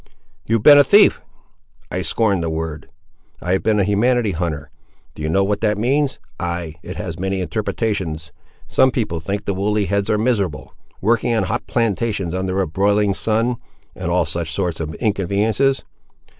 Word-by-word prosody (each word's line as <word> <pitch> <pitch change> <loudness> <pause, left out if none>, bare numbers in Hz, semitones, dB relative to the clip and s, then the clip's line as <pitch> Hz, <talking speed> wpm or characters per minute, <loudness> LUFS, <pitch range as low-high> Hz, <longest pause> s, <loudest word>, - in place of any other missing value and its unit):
"You 115 - +2
have 110 - -1
been 145 +1 +9
a - - +8
thief." 205 +9 +5 0.7
"I 90 - -2
scorn 100 +2 +1
the 85 - -1
word. 80 -1 -4 0.5
I 90 - -3
have 95 - +2
been 110 -1 +2
a - - +4
humanity 110 +3 +2
hunter. 80 -4 -3 0.4
Do - - -10
you 75 - -2
know 95 +5 +3
what 105 +1 -1
that 105 -2 +1
means? 135 +5 +1 0.2
Ay, 85 -2 -3
it - - -7
has 85 +2 -5
many 95 +1 -1
interpretations. 90 -4 -2 0.4
Some 130 - +4
people 110 -10 -2
think 100 +6 -4
the 100 - 0
woolly 105 +2 0
heads 100 +1 -1
are 105 - +2
miserable, 100 - -1 0.3
working 115 +3 +2
on 110 - +1
hot 110 +6 -3
plantations 105 -5 -1
under 95 +1 -1
a 95 - 0
broiling 100 +4 +2
sun—and 115 +4 -3
all - - +2
such 85 -2 -3
sorts 85 -1 -2
of 80 0 -4
inconveniences. 110 +6 +1
100 Hz, 170 wpm, -20 LUFS, 85-110 Hz, 0.7 s, been